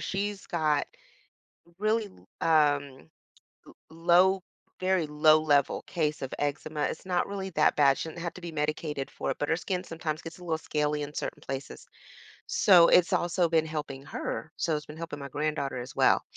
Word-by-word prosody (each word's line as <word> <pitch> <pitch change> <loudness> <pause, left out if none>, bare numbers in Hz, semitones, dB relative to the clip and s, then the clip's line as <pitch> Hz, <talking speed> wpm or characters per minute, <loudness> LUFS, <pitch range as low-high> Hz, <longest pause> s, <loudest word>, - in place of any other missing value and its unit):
she's 200 0 -3
got 155 -4 +1 0.9
really 215 +1 +1 0.3
l - - 0
um, 145 - +2 0.6
l - - -15
low 175 +3 +3 0.4
very 185 -3 +1
low 155 +1 +5
level 145 -3 +2
case 155 -3 -1
of 135 - -4
eczema, 145 +1 -2
it's - - -2
not 180 -1 +1
really 195 -1 -4
that 155 -2 +3
bad, 140 -2 +4
she - - -4
doesn't 170 +2 -9
have 170 0 -4
to 185 - -10
be 170 -1 -6
medicated 150 -2 -2
for - - -3
it, - - -4
but 145 - -1
her 165 - +3
skin 180 +1 -3
sometimes 160 -2 -4
gets 165 +1 -9
a 180 - -13
little 160 -2 -1
scaly 150 -1 -1
in 145 0 -4
certain - - -4
places. 135 +1 -7 0.6
So, 190 - +6
it's 180 +2 +5
also 175 0 +2
been 160 -1 +2
helping 145 -3 -5
her, 160 +2 -5
so 160 -2 0
it's 150 - -7
been 150 - -10
helping 165 -3 -6
my 140 - -6
granddaughter 145 -2 -2
as 125 +1 -8
well. - - +4
155 Hz, 185 wpm, -28 LUFS, 150-175 Hz, 0.9 s, So